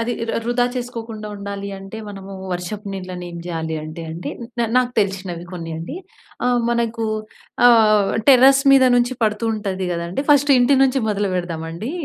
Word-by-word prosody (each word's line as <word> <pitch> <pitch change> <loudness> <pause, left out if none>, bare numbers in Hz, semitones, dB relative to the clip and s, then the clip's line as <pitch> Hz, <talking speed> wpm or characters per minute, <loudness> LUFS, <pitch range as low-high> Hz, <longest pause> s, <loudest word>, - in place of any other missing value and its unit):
అది 235 +1 -1 0.2
ర - - +1
వృధా 245 +1 +1
చేసుకోకుండా 230 -3 -5
ఉండాలి 200 0 -6
అంటే 195 +3 -9
మనము 195 -1 -9 0.2
వర్షపు 200 +4 -5
నీళ్లని 185 -2 -6
ఏం 170 - -8
జేయాలి 160 -2 -3
అంటే 155 +2 -7
అండి. 165 +2 -5 0.3
న - - +2
నాకు 250 -1 +2
తెలిసినవి 190 -3 -3
కొన్ని 165 -2 -6
అండి. 170 - -6 0.5
ఆహ్, 245 -1 +2
మనకు 230 -1 -1 0.6
ఆహ్, 215 -4 +5 0.2
టెర్రస్ 270 +1 +7
మీద 270 -1 +7
నుంచి 245 +1 +1
పడుతూ 215 +1 +1
ఉంటది 190 -3 -3
కదండీ! 170 +10 -3
ఫస్ట్ 290 0 +5
ఇంటి 260 +3 +4
నుంచి 270 0 +2
మొదలు 205 -2 0
పెడదామండి. 170 - -4
210 Hz, 160 wpm, -20 LUFS, 180-240 Hz, 0.6 s, టెర్రస్